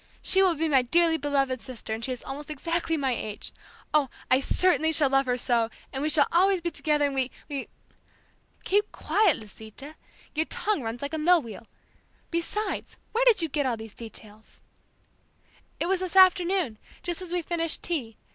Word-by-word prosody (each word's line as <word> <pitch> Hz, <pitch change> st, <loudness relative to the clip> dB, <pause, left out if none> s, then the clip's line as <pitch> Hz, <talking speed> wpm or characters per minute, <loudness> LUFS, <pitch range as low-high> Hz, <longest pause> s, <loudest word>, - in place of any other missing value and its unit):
She 380 Hz, -, +4 dB
will 370 Hz, -3 st, +4 dB
be 320 Hz, +2 st, 0 dB
my 275 Hz, -4 st, +4 dB
dearly 330 Hz, +6 st, +3 dB
beloved 275 Hz, -4 st, 0 dB
sister 235 Hz, -4 st, -7 dB
and 225 Hz, +1 st, -5 dB
she 260 Hz, -, -1 dB
is 250 Hz, -, -5 dB
almost 285 Hz, +3 st, -7 dB
exactly 330 Hz, +2 st, -1 dB
my 270 Hz, -3 st, 0 dB
age. 215 Hz, -3 st, -5 dB, 0.4 s
Oh, 295 Hz, -3 st, +3 dB, 0.2 s
I 255 Hz, -, +6 dB
certainly 320 Hz, +2 st, +3 dB
shall 295 Hz, -4 st, +4 dB
love 270 Hz, -1 st, +3 dB
her 250 Hz, 0 st, +1 dB
so, 235 Hz, -2 st, +1 dB, 0.2 s
and 265 Hz, -, -3 dB
we 305 Hz, -, +1 dB
shall 295 Hz, -2 st, +5 dB
always 380 Hz, +2 st, +4 dB
be 345 Hz, 0 st, -3 dB
together 300 Hz, -3 st, +1 dB
and 280 Hz, -, -1 dB
we, 265 Hz, -1 st, 0 dB, 0.2 s
we...." 280 Hz, -2 st, -4 dB, 1.0 s
"Keep 415 Hz, +2 st, +1 dB
quiet, 410 Hz, -7 st, +2 dB
Lisita. 220 Hz, +7 st, -11 dB, 0.4 s
Your 315 Hz, +1 st, -1 dB
tongue 425 Hz, -8 st, -1 dB
runs 230 Hz, +2 st, -5 dB
like 280 Hz, -, -4 dB
a 315 Hz, -, -1 dB
mill 340 Hz, 0 st, +4 dB
wheel. 225 Hz, -1 st, -10 dB, 0.6 s
Besides, 345 Hz, +6 st, -3 dB
where 475 Hz, +3 st, +1 dB
did 455 Hz, -8 st, +5 dB
you -, -, +1 dB
get 290 Hz, -2 st, -1 dB
all 240 Hz, -3 st, -1 dB
these 220 Hz, -1 st, -10 dB
details?" 220 Hz, -2 st, -12 dB, 1.2 s
"It -, -, 0 dB
was 375 Hz, +1 st, +1 dB
this 370 Hz, -1 st, -4 dB
afternoon, 365 Hz, -, +4 dB, 0.2 s
just 345 Hz, 0 st, -3 dB
as 360 Hz, -2 st, -7 dB
we 355 Hz, -1 st, 0 dB
finished 330 Hz, -1 st, -1 dB
tea. 260 Hz, -11 st, -3 dB
300 Hz, 185 wpm, -27 LUFS, 255-345 Hz, 1.2 s, I